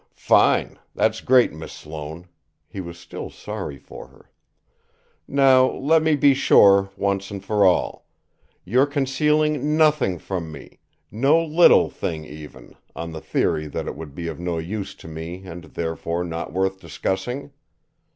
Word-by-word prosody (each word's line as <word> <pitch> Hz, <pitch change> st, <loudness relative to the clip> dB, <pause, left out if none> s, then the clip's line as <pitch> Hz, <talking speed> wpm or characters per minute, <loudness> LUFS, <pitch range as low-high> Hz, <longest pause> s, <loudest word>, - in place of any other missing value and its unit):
"Fine! -, -, +2 dB, 0.2 s
That's 110 Hz, 0 st, +1 dB
great, 125 Hz, -7 st, +4 dB
Miss 80 Hz, 0 st, -9 dB
Sloane!" 80 Hz, +3 st, -9 dB, 0.4 s
He 95 Hz, -, -7 dB
was 85 Hz, -1 st, -9 dB
still 85 Hz, -, -8 dB
sorry 70 Hz, -, -7 dB
for -, -, -12 dB
her. -, -, -23 dB, 1.0 s
"Now, 135 Hz, -2 st, +5 dB
let 160 Hz, +4 st, +2 dB
me 160 Hz, -1 st, +2 dB
be 140 Hz, 0 st, +5 dB
sure, 100 Hz, -7 st, +5 dB
once 100 Hz, 0 st, -1 dB
for 100 Hz, +1 st, -1 dB
all: 95 Hz, -2 st, +1 dB, 0.6 s
you're 125 Hz, +9 st, +3 dB
concealing 150 Hz, +1 st, +1 dB
nothing 150 Hz, -, +3 dB
from 85 Hz, -2 st, -5 dB
me, 75 Hz, -, -12 dB, 0.3 s
no 135 Hz, +9 st, +3 dB
little 165 Hz, +2 st, +5 dB
thing 80 Hz, -2 st, -4 dB
even, 75 Hz, 0 st, -12 dB, 0.2 s
on 85 Hz, 0 st, -6 dB
the 80 Hz, -1 st, -7 dB
theory 75 Hz, 0 st, -1 dB
that -, -, -5 dB
it -, -, -5 dB
would 75 Hz, -2 st, -9 dB
be 85 Hz, -1 st, -5 dB
of 85 Hz, -, -6 dB
no 85 Hz, -1 st, -2 dB
use 95 Hz, +5 st, -5 dB
to -, -, -13 dB
me 80 Hz, +4 st, -7 dB
and, 90 Hz, -1 st, -9 dB
therefore, 85 Hz, +1 st, -3 dB
not 85 Hz, -3 st, -5 dB
worth 95 Hz, +2 st, -1 dB
discussing? 125 Hz, +10 st, -4 dB
95 Hz, 150 wpm, -22 LUFS, 80-135 Hz, 1.0 s, Now